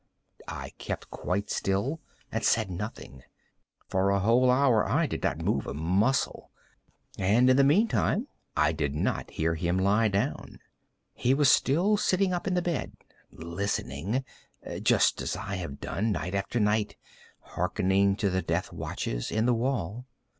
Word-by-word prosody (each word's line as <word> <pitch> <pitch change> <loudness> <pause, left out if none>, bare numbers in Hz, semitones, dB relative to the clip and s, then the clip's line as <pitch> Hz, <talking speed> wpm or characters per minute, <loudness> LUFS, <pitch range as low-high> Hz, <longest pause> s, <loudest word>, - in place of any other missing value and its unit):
I - - -6
kept - - -5
quite 100 +3 -2
still 110 +12 -1 0.3
and - - -2
said 110 -4 +2
nothing. 90 - -7 0.7
For 95 +1 +1
a 100 0 +2
whole 120 +6 +4
hour 125 -4 +4
I - - +1
did - - -4
not - - -1
move - - 0
a - - -4
muscle, 95 - 0 0.7
and 110 +7 +4
in - - +5
the 140 - +5
meantime 210 - +2 0.3
I 75 +1 +4
did 75 -3 -2
not - - -1
hear 80 +1 -1
him 85 +2 -1
lie 100 +4 +3
down. 100 -1 -2 0.6
He 130 +2 +1
was 145 -1 +5
still 180 +10 +3
sitting 185 -1 +1
up 175 - -3
in 185 - +1
the 180 - +1
bed 170 -6 -2 0.4
listening;—just 90 - -2
as - - -2
I 100 -1 -4
have 85 -6 -6
done, 110 +3 -2
night 90 +1 -4
after 100 +4 -1
night, 105 0 +1 0.4
hearkening 100 +1 +1
to 100 -2 0
the 95 0 0
death - - -2
watches - - -4
in 110 +1 0
the 125 - +3
wall. 120 -1 -2
105 Hz, 155 wpm, -28 LUFS, 95-130 Hz, 0.7 s, in